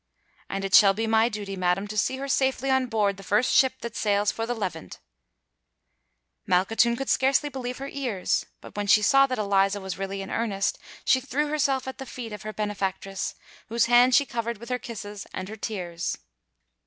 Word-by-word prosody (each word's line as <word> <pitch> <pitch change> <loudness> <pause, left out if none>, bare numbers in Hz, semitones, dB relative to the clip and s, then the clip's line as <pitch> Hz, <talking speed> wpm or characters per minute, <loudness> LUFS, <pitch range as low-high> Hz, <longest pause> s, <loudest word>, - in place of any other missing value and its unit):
"And 195 0 -3
it 195 - -4
shall 195 -2 +7
be 225 +2 -1
my 225 +1 +3
duty, 205 -3 -5
madam, 185 +2 0
to 215 - -5
see 260 +5 +1
her 275 +1 -5
safely 265 0 +1
on 265 -1 +2
board 210 -4 0
the - - -10
first 210 +6 +2
ship 265 -3 +5
that 235 -2 -6
sails 205 -1 +1
for 225 0 -4
the 245 - -1
Levant," 185 -7 -5
said - - -23
Filippo. 60 0 -31
Malkhatoun 225 +6 +3
could 270 - -4
scarcely 275 +3 +2
believe 250 -2 -5
her 275 - -6
ears; 250 -10 -1
but - - -13
when 205 0 -2
she 210 +1 +5
saw 275 +5 +5
that 255 - -2
Eliza 200 -1 +2
was 190 -1 -6
really 195 0 -3
in 195 - -8
earnest, 200 -4 -1 0.3
she 260 - +4
threw 290 +3 -1
herself 275 -3 0
at 265 - -6
the 265 - -7
feet 235 -3 -7
of 210 - -7
her 215 - -5
benefactress, 195 -2 -3 0.3
whose 230 +1 +2
hand 245 +1 +5
she 285 - +5
covered 235 -2 -3
with 235 +3 -11
her 250 0 -1
kisses 205 -4 -8
and 185 +1 -5
her 215 - -6
tears. 180 -5 -4
215 Hz, 205 wpm, -26 LUFS, 195-255 Hz, 0.3 s, shall